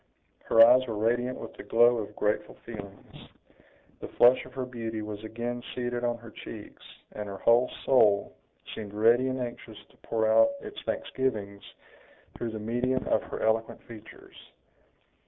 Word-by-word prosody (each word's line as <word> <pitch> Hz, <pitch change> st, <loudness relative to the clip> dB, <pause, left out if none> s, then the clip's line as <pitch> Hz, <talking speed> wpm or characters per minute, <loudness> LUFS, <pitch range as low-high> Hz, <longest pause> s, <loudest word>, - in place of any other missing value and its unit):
Her 115 Hz, 0 st, +8 dB
eyes 125 Hz, +2 st, +5 dB
were 110 Hz, -2 st, -4 dB
radiant 120 Hz, +4 st, 0 dB
with -, -, -9 dB
the -, -, -10 dB
glow 120 Hz, +1 st, +4 dB
of 105 Hz, -1 st, -7 dB
grateful 105 Hz, 0 st, -1 dB
feelings; 100 Hz, -4 st, -11 dB, 0.7 s
the -, -, -7 dB
flush 125 Hz, +2 st, +4 dB
of 130 Hz, -, -16 dB
her 130 Hz, -1 st, -3 dB
beauty 115 Hz, -3 st, -5 dB
was 105 Hz, 0 st, -7 dB
again 120 Hz, +2 st, -4 dB
seated 120 Hz, -1 st, -3 dB
on 120 Hz, -1 st, 0 dB
her 115 Hz, -1 st, -13 dB
cheeks, 105 Hz, 0 st, -10 dB, 0.3 s
and 105 Hz, 0 st, -6 dB
her 100 Hz, -, -6 dB
whole 120 Hz, +4 st, +4 dB, 0.2 s
soul 105 Hz, -7 st, +3 dB, 0.4 s
seemed 105 Hz, -2 st, -8 dB
ready 115 Hz, +4 st, +4 dB
and 130 Hz, 0 st, -2 dB
anxious 120 Hz, -3 st, -7 dB
to -, -, -26 dB
pour 110 Hz, -1 st, -1 dB
out 280 Hz, -, +5 dB
its 420 Hz, +3 st, -9 dB
thanksgivings 105 Hz, -7 st, -2 dB, 0.7 s
through 120 Hz, -, -4 dB
the 110 Hz, -, -6 dB
medium 120 Hz, +4 st, -1 dB
of -, -, +2 dB
her -, -, -7 dB
eloquent 110 Hz, 0 st, 0 dB
features. 110 Hz, -2 st, -13 dB
115 Hz, 160 wpm, -28 LUFS, 110-125 Hz, 0.7 s, Her